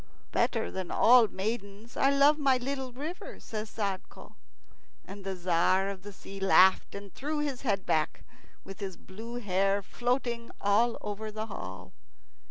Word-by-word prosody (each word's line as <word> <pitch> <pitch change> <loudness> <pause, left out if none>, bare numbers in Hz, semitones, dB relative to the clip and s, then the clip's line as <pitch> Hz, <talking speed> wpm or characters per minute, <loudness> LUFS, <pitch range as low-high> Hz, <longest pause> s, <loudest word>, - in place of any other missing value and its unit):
"Better 225 -2 +1
than 185 -2 -4
all 240 -1 +6
maidens 205 +2 -5
I 270 - +4
love 280 +2 +5
my 270 -3 +4
little 265 0 -3
river," 300 +8 -7
says 215 -1 -5
Sadko; 200 -4 -5 0.7
and 200 +1 -9
the 195 0 -3
Tzar 185 +2 +2
of 195 -2 -6
the 205 +2 -9
Sea 195 0 -10
laughed 190 0 +5
and 200 -1 -9
threw 300 +3 -3
his 290 -4 -2
head 200 -7 0
back, 155 -1 0 0.4
with 195 - -10
his 195 -3 -5
blue 225 +5 -9
hair 195 -3 +1
floating 240 +1 -2
all 220 +4 +3
over 210 +1 -5
the 215 +1 -4
hall. 95 - -8
210 Hz, 155 wpm, -30 LUFS, 195-245 Hz, 0.7 s, all